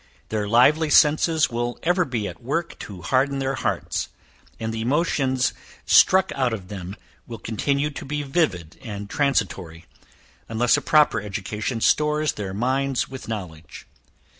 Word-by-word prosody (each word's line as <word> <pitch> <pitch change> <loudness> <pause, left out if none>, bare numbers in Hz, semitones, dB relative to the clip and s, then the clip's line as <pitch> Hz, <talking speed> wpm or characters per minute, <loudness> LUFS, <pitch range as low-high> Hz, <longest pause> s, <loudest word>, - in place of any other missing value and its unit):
Their 105 -2 -2
lively 145 +8 +4
senses 155 +1 +4
will 120 +1 -2
ever 180 +1 +2
be 115 -7 -3
at - - -9
work 165 +8 -3
to 95 -4 -9
harden 135 +9 +1
their 135 0 -1
hearts, 130 - -2 0.5
and 110 0 -3
the 110 - -3
emotions 130 -1 +1 0.3
struck 190 0 +5
out 130 -4 0
of 95 -4 -6
them 95 -1 -7 0.3
will 115 - -7
continue 140 +8 -1
to - - -8
be 145 +2 -3
vivid 115 - -1
and 105 -5 -7
transitory, 90 - -1 0.6
unless 115 +2 +3
a - - -1
proper 150 -7 +3
education 105 +3 -4
stores 150 +2 +2
their 100 -2 -5
minds 130 +5 -1
with 130 0 -9
knowledge. 90 -8 -7
125 Hz, 145 wpm, -23 LUFS, 105-145 Hz, 0.6 s, struck